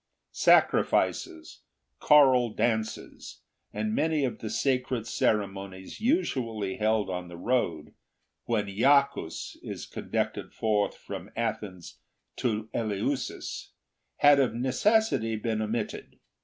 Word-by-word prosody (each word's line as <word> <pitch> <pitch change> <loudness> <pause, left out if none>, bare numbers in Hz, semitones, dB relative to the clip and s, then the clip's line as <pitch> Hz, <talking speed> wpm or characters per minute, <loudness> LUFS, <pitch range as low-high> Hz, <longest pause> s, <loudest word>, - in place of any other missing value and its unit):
Sacrifices, 80 -1 +2 0.4
choral 130 -5 +5
dances, 110 -2 -3 0.3
and 105 +1 -2
many 155 +1 +1
of 125 - -4
the 110 - -5
sacred 125 -2 0
ceremonies 100 - -2
usually 120 - 0
held 110 -1 +1
on 90 -1 -4
the 85 0 -10
road, 90 -7 -1 0.5
when 110 -3 0
Iacchus 135 - +1
is - - -6
conducted - - -3
forth 105 -2 0
from - - -8
Athens 105 -6 -4 0.4
to 110 -3 -1
Eleusis, 115 +5 -3 0.4
had 145 -1 +6
of 125 -5 +1
necessity 130 - +1
been 110 0 -2
omitted. 110 +2 -4
110 Hz, 100 wpm, -28 LUFS, 105-130 Hz, 0.5 s, had